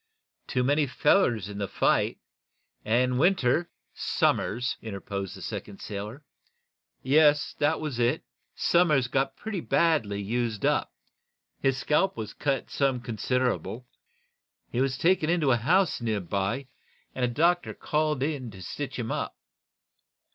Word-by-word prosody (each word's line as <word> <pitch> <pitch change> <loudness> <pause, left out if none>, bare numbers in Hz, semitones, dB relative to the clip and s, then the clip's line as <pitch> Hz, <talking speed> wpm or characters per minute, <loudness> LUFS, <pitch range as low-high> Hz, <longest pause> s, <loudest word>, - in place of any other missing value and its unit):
Too 125 - 0
many 145 +3 +2
fellers 125 - +2
in 100 0 -7
the 100 - -1
fight, - - +1 0.7
and 125 +3 +2
Winter 170 -1 +3 0.2
" - - -47 0.3
"Somers," 125 +4 +1
interposed 100 -3 -5
the - - -9
second 100 - -6
sailor. 105 +7 -6 0.8
"Yes; 145 +1 +4
that 150 +2 +2
was 150 -6 -4
it. 120 +1 +1 0.3
Somers 155 -8 +3
got 135 +2 0
pretty 215 -4 -4
badly 150 -13 +1
used 115 +1 -2
up. - - +1 0.7
His 135 -1 +1
scalp 155 +8 +1
was 110 -2 -5
cut 140 -2 -2
some 135 -3 +1
considerable. 125 +1 -1 0.9
He 120 - 0
was 135 -1 0
taken 170 -1 +2
into 165 -6 +3
a 120 - +4
house 170 - +2
nearby, 100 +3 -1 0.5
and 130 - -3
a - - +4
doctor 170 +8 +1
called 150 -3 0
in 140 -5 -2
to 95 -3 -10
stitch 135 +6 -5
him 115 -2 -3
up. - - -3
130 Hz, 135 wpm, -27 LUFS, 115-150 Hz, 0.9 s, Yes